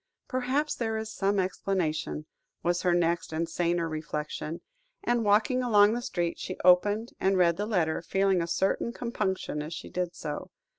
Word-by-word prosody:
"Perhaps 260 +4 0
there 225 -2 -2
is 220 0 -5
some 200 +1 +1
explanation," 180 -5 -1 0.4
was 175 0 +1
her 175 -1 +3
next 170 0 +1
and 165 +1 -1
saner 170 0 0
reflection; 155 0 -4 0.4
and, 240 -1 +1
walking 215 +5 +3
along 210 -3 +5
the 240 - -2
street, 175 -9 -2
she 185 - -5
opened, 205 +6 +4
and 190 0 +2
read 170 -2 +4
the 205 +3 -2
letter, 170 -7 +1
feeling 195 -2 +2
a 170 - -2
certain 195 +6 0
compunction 195 -10 -2
as 155 +3 -5
she - - -8
did 180 -1 -2
so. 150 -2 -5
185 Hz, 165 wpm, -28 LUFS, 170-215 Hz, 0.4 s, along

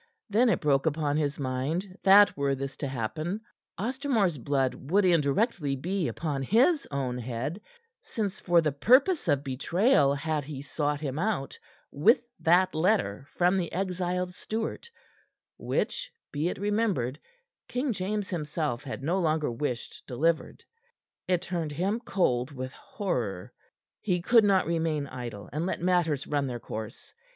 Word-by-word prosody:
Then 235 +4 +4
it - - +1
broke 140 -1 +2
upon 150 -2 0
his 150 -1 -1
mind 145 +9 -2
that 200 +1 +7
were 140 -1 0
this 135 0 -5
to 140 - -3
happen, 155 - -3 0.4
Ostermore's 230 - 0
blood 135 0 +1 0.2
would 200 +3 +4
indirectly 160 - +2
be 180 +5 -1
upon 145 -5 -3
his 255 - +3
own 130 -3 -2
head, 130 - -4 0.4
since 210 -3 -3
for 175 -2 +4
the 155 -2 +1
purpose 260 - +4
of 145 -3 +2
betrayal 145 - +2
had 150 +1 -2
he 145 -2 -6
sought 145 +1 -2
him 140 -1 -3
out 190 -8 -2 0.3
with 215 - +4 0.2
that 180 +2 +4
letter 155 - +1
from 180 +2 +2
the 170 -3 -3
exiled 180 -1 -2
Stuart 225 - -4 0.7
which, - - -2 0.2
be 150 +4 0
it - - -4
remembered, 200 - 0 0.5
King 255 0 -1
James 205 +1 -2
himself 150 -6 -2
had 135 -1 -6
no 175 +6 +1
longer 155 -5 +1
wished 120 0 -4
delivered. 155 +6 0 0.6
It 180 -2 +1
turned 165 -4 -3
him 195 +9 0
cold 130 - 0
with 130 -2 -6
horror. 115 - -4 0.5
He 180 -4 0
could 225 +5 +5
not 195 -2 +4
remain 160 -3 0
idle 120 -6 -7
and 160 +4 -1
let - - -2
matters 170 -5 +1
run 145 -2 0
their 120 -2 -4
course. 110 -1 -8
160 Hz, 145 wpm, -28 LUFS, 140-195 Hz, 0.7 s, that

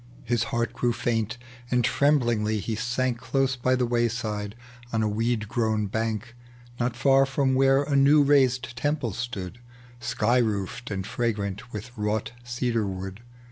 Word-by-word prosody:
His 120 -2 0
heart 120 +1 -1
grew 120 -1 0
faint, 115 -1 -1 0.3
and 125 0 +2
tremblingly 120 -7 +2
he 110 +3 -3
sank 125 +2 -1
Close 130 +2 0
by 130 +1 +1
the 125 -1 +1
wayside 115 -3 -1 0.4
on 110 -1 +1
a - - +2
weed 110 +1 0
grown 110 -1 0
bank. 110 +2 -3 0.4
Not 120 0 0
far 135 +2 +4
IVom 135 -1 +1
where 135 +1 +4
a 145 0 -1
new 145 +2 +6
raised 130 -4 +3
temple 145 -4 -1
stood, 115 -3 -5 0.4
Sky 120 +1 +1
roofed, 110 0 -2
and 95 -2 -3
fragi 110 -2 -1
ant 100 +5 -6
with 110 +4 -7
wrought 105 0 -1
cedar 120 -3 -1
wood. 95 +2 -6
120 Hz, 155 wpm, -26 LUFS, 110-125 Hz, 0.4 s, new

